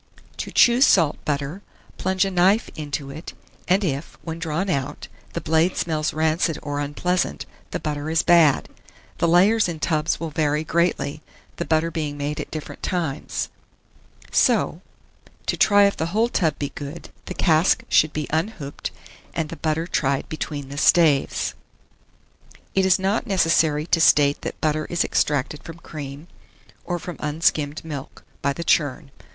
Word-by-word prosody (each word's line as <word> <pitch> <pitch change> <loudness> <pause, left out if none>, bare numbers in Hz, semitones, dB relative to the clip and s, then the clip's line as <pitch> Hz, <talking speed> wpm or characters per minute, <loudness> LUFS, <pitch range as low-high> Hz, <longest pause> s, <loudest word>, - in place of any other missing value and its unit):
To - - -4
choose 245 +3 +5
salt 165 -6 +3
butter, 145 +5 -2 0.4
plunge 190 +1 +1
a 195 - -2
knife 190 +5 +3
into 145 -2 -4
it, 155 +4 -9 0.3
and 190 +4 +3
if, 145 -3 -3
when 165 0 -5
drawn 165 +3 -2
out, 140 -8 -2 0.3
the - - -3
blade 160 +3 +2
smells 155 -2 0
rancid 160 +1 +1
or 145 -1 -3
unpleasant, 175 +5 -1 0.2
the - - -3
butter 150 0 -3
is 160 0 +2
bad. 170 -5 +5 0.5
The 170 - +2
layers 190 +5 +4
in 165 -2 -5
tubs 155 0 0
will 165 -1 -4
vary 150 0 0
greatly, 160 -2 0 0.4
the 170 - -2
butter 165 +1 +1
being 150 -3 -3
made 145 +1 -3
at - - -5
different 155 -2 -7
times; 160 -5 -2 0.8
so, - - +2 0.6
to - - 0
try 205 -1 +5
if 200 - +1
the 160 - -1
whole 220 +7 +1
tub 160 -9 +1
be 145 - -3
good, 145 +3 -8 0.2
the - - -6
cask 160 0 +3
should 155 - +4
be 150 -1 -3
unhooped, 160 -3 -3 0.5
and 160 -2 -1
the 165 - -6
butter 160 0 -1
tried 140 -5 0
between 145 -3 -5
the 140 +1 -5
staves. 155 -4 +3 1.2
It 190 -1 +3
is 190 - +5
not 195 +4 0
necessary 160 -5 +2
to 165 -1 +2
state 145 -2 +4
that - - -6
butter 155 0 0
is 175 0 0
extracted 145 +1 0
from 165 0 -9
cream, 145 -1 -8 0.6
or 175 - -2
from 175 0 -7
unskimmed 150 0 0
milk, 145 -4 -7 0.2
by 140 - +1
the 170 +4 -4
churn. 145 -3 +1
160 Hz, 160 wpm, -23 LUFS, 145-175 Hz, 1.2 s, choose